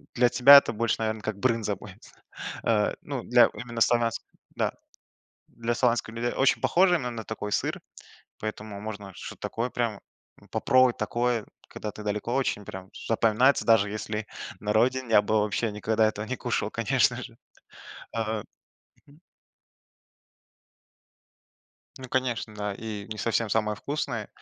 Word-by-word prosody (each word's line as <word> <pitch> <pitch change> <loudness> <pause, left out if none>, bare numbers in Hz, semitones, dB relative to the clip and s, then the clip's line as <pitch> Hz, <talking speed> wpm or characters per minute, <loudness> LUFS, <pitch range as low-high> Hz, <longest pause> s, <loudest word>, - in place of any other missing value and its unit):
для 125 0 +4
тебя 140 +4 +9
это 140 - +3
больше, 115 +1 0
наверно, 110 -1 -2
как 105 -1 -4
брынза 115 -3 +1
будет. 95 +1 -13 0.6
Э, 105 -2 +2
ну, - - -4
для - - +6
именно 120 -1 -6
славянской 115 0 +2 0.3
да. - - 0 0.8
Для 115 +1 -3
славянских 120 -2 +1
людей 120 +1 -1
очень 135 - +3
похоже, 180 0 +4
но 125 -4 -3
именно 115 -2 -6
такой 105 -1 -5
сыр, - - -1 0.6
поэтому 105 -1 -6
можно 105 -2 -7
что-то - - -9
такое 120 +2 -3
прям, 115 -4 -1 0.4
м, - - -20
попробовать 130 -1 +3
такое, 120 -2 0 0.2
когда 105 - -6
ты 105 - -10
далеко 105 +3 -2
очень, 130 -6 0
прям 95 0 -8
з - - -10
запоминается. 115 +4 +3
Даже 110 -3 +4
если 105 0 -4 0.3
на 105 +1 -1
родине 125 +2 +2
я 105 -2 +6
бы 110 +1 +2
вообще 105 +2 0
никогда 110 +1 +1
этого 110 0 -3
не 130 - -3
кушал, - - -2
конечно - - +1
же. - - -10 0.8
А. 110 -1 -2 0.7
Мгм. 145 +2 -19 2.8
Ну, 130 -1 -9
конечно, 125 -4 -1
да 105 -1 -3
и 105 -1 -6
не 110 - -4
совсем 115 +1 0
самое 105 0 0
вкусное, 125 -6 -3
110 Hz, 150 wpm, -27 LUFS, 105-120 Hz, 2.8 s, тебя